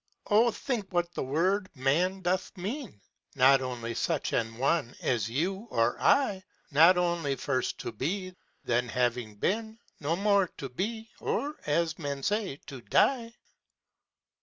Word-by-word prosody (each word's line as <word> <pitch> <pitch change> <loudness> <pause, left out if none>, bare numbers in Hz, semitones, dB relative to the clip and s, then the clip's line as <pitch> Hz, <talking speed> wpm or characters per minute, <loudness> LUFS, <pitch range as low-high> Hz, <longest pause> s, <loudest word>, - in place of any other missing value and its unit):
â - - -17
Oh 225 +3 +6
think 220 -2 -3
what 175 -1 0
that - - -3
word 185 +9 +1
man 170 +9 +1
doth 185 +2 -1
mean; 205 - -5 0.4
Not 135 +1 +6
only 120 -2 -4
such 155 +5 -1
an 115 -1 -1
one 135 -1 +1
as 115 -3 0
you 190 - -2
or 115 +1 +2
I 265 -9 +3
j - - -24 0.3
Not 165 +5 +7
only 170 -5 0
first 130 -2 -1
to - - -4
be 185 - -3
â - - -27 0.3
then 120 +1 0
having 120 -2 -1
been. 220 - -1 0.2
No 155 +2 0
more 200 0 +3
to 135 - -5
be, 220 - -4
or, 295 +2 -2
as 165 +2 +1
men 140 -3 -4
say, 205 -5 0
to 135 -3 -9
die. 235 - +2
170 Hz, 160 wpm, -29 LUFS, 130-200 Hz, 0.4 s, Not